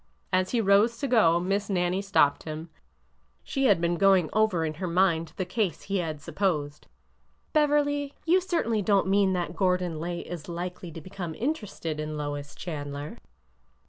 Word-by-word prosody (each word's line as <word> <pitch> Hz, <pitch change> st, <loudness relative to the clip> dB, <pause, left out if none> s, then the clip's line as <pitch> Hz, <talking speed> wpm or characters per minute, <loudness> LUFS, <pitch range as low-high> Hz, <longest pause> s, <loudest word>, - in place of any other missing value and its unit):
As 185 Hz, 0 st, +2 dB
he 240 Hz, -, +1 dB
rose 210 Hz, +3 st, +4 dB
to 280 Hz, -, -2 dB
go. 205 Hz, -10 st, +4 dB
Miss 195 Hz, +3 st, -1 dB
Nannie 180 Hz, 0 st, +1 dB
stopped 190 Hz, -8 st, +3 dB
him. 160 Hz, +1 st, -7 dB, 0.7 s
She 270 Hz, 0 st, -1 dB
had 205 Hz, -8 st, +5 dB
been 170 Hz, 0 st, 0 dB
going 190 Hz, -4 st, +4 dB
over 215 Hz, -7 st, +2 dB
in 155 Hz, -, -2 dB
her 185 Hz, -, -1 dB
mind 170 Hz, -2 st, +2 dB
the 185 Hz, -, -1 dB
case 185 Hz, 0 st, -2 dB
he 195 Hz, 0 st, -1 dB
had 160 Hz, -4 st, -3 dB
supposed. 150 Hz, -6 st, -2 dB, 0.3 s
'' -, -, -41 dB
Beverly, 290 Hz, -1 st, +2 dB
you 360 Hz, +3 st, +4 dB
certainly 325 Hz, -, 0 dB
don't 200 Hz, 0 st, +3 dB
mean 195 Hz, 0 st, +3 dB
that 175 Hz, -1 st, -2 dB
Gordon 180 Hz, -4 st, 0 dB
Lay 170 Hz, +1 st, -3 dB
is 175 Hz, -2 st, -8 dB
likely 175 Hz, 0 st, -5 dB
to 165 Hz, -, -8 dB
become 180 Hz, -3 st, -6 dB
interested 210 Hz, -, -3 dB
in 155 Hz, 0 st, -4 dB
Lois 145 Hz, -1 st, -5 dB
Chandler 145 Hz, -3 st, -6 dB
185 Hz, 170 wpm, -27 LUFS, 165-205 Hz, 0.7 s, had